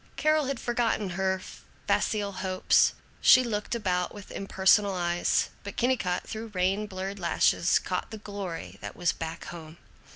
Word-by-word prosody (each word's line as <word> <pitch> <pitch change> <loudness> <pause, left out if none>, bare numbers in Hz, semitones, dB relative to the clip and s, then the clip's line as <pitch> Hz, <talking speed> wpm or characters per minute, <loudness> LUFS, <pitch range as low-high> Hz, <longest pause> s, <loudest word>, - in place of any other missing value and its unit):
Carol 310 -1 +2
had 270 -2 -2
forgotten 230 -5 0
her 190 +1 0 0.5
facile 205 -2 +1
hopes. 185 -1 +2 0.3
She 255 - +7
looked 215 -1 -2
about 180 -5 0
with 205 -1 -11
impersonal 195 +1 +3
eyes. 175 -1 +1
But 200 - -8
Kennicott, 235 -8 0
through 220 +1 -5
rain 190 +3 +1
blurred 195 0 -5
lashes, 170 - +3
caught - - -3
the 220 - -7
glory 185 - -6
that 100 -1 -7
was 175 -1 +1
Back 165 0 -6
Home. 160 -1 -10
195 Hz, 150 wpm, -28 LUFS, 180-215 Hz, 0.5 s, She